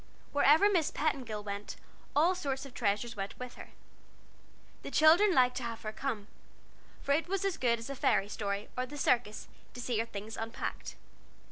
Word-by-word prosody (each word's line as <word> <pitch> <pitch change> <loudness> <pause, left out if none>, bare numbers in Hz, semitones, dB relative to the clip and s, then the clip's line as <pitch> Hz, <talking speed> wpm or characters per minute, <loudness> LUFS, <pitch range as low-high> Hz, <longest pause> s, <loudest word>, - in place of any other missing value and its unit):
Wherever 295 +7 +6
Miss 355 -7 +2
Petingill 250 -9 -2
went, 200 0 -5 0.4
all 330 +5 +5
sorts 275 -7 -3
of 270 - -11
treasures 225 +2 -1
went 195 -1 -5
with 250 -1 -7
her. - - -11 1.1
The - - -6
children 335 +7 +6
liked 250 -1 +4
to 255 - -3
have 230 -1 -5
her 215 - -3
come, 225 -5 -3 0.8
for 280 - -1
it 315 +4 +2
was 390 +1 -1
as 390 - 0
good 235 -2 +2
as 230 - -8
a 275 - -4
fairy 200 - +2
story, 200 0 -3
or 255 0 -2
the 290 +3 -8
circus, 235 -6 +1 0.3
to - - -7
see 240 -2 -1
her 230 - -1
things 210 +1 -7
unpacked. 225 0 -5
250 Hz, 180 wpm, -32 LUFS, 215-290 Hz, 1.1 s, Wherever